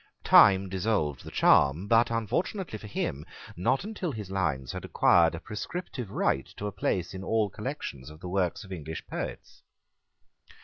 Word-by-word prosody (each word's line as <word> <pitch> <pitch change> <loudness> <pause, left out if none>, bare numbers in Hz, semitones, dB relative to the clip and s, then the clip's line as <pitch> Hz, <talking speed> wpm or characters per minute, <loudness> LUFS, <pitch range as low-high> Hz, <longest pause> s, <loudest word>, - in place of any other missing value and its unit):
Time 95 -1 +7
dissolved 95 - -1
the - - -8
charm, 75 +7 +4
but, 115 +2 +4
unfortunately 115 - -2
for 105 - -9
him, 75 -7 -3 0.3
not 125 - +1
until 205 -5 -4
his 105 -6 -7
lines 75 -9 -1
had - - -6
acquired 85 -1 +4
a - - -6
prescriptive 120 - -6
right 65 -8 0
to 105 - -5
a 105 - -2
place 90 -2 -2
in 95 0 -6
all 110 0 +1
collections 65 0 -6
of 75 0 -13
the 90 - -8
works 90 -1 -1
of 95 - -13
English 80 -3 -6
poets. - - -6
95 Hz, 165 wpm, -28 LUFS, 80-110 Hz, 0.3 s, Time